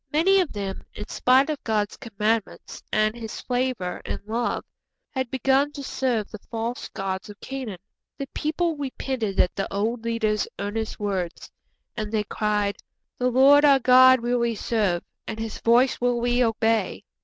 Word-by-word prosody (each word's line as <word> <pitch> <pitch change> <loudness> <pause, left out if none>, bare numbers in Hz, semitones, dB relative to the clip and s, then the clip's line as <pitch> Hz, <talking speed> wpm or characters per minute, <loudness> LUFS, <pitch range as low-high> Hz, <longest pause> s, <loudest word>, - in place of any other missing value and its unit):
Many 380 +6 +4
of 360 -5 0
them, 195 -2 -4
in 210 - -7
spite 265 +4 +3
of 300 - -5
God's 210 -2 0
commandments 220 -2 -2
and 215 0 +2
His 225 -2 -7
favour 245 -7 -2
and - - -4
love, 230 +3 -2 0.5
had 260 -2 -2
begun 270 +3 +2
to 280 - -7
serve 245 -6 -1
the 215 - -8
false 230 +1 -4
gods 190 -1 -4
of 205 - -11
Canaan. 260 -8 -6 0.4
The 275 - -4
people 325 +2 -1
repented 260 -7 -3
at 180 - +3
the 195 - -3
old 225 +4 -1
leader's 220 -2 0
earnest 215 +2 -3
words, 190 -4 -3 0.4
and 215 -2 -4
they 215 -2 +1
cried, 210 -1 -1 0.4
'_The 250 0 +1
Lord 275 +4 +6
our 280 -2 +7
God 255 0 +7
will 240 +1 0
we 235 -1 0
serve, 205 -6 0 0.2
and 220 - -4
His 225 -1 -5
voice 245 +3 +3
will 245 -1 +2
we 245 +1 +2
obey. 225 -1 0
230 Hz, 165 wpm, -25 LUFS, 210-260 Hz, 0.5 s, our